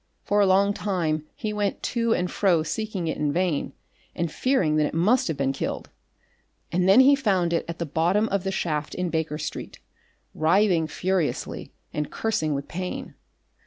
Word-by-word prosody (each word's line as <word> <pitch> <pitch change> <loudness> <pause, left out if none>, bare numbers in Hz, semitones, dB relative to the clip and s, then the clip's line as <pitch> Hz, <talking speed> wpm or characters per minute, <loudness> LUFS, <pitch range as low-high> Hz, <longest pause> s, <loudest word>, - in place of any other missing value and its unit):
For 205 0 +2
a 200 - +4
long 200 +2 +4
time 165 -7 -1
he 215 -1 -3
went 205 -1 -2
to 230 -1 0
and 180 -4 +1
fro 175 -6 +2
seeking 215 -1 -3
it 160 - -2
in 150 -1 +1
vain 175 -2 -1 0.4
and 170 -2 -2
fearing 185 - +1
that 150 -1 +3
it - - -6
must 210 +10 +3
have 160 -4 -2
been 135 -1 0
killed, - - -4 0.8
and 180 +2 +2
then 200 +7 +8
he 275 +2 +7
found 190 -10 +1
it 170 - 0
at 170 0 -5
the 170 - -2
bottom 175 +8 +1
of 200 -2 0
the 195 - -1
shaft 155 -5 -2
in 180 -2 -2
Baker 160 -2 -1
Street, 155 - -6 0.5
writhing 170 0 +3
furiously 185 0 -2 0.2
and 150 -1 -2
cursing 160 -10 -1
with 140 0 -4
pain. 180 +1 -5
180 Hz, 180 wpm, -25 LUFS, 155-200 Hz, 0.8 s, then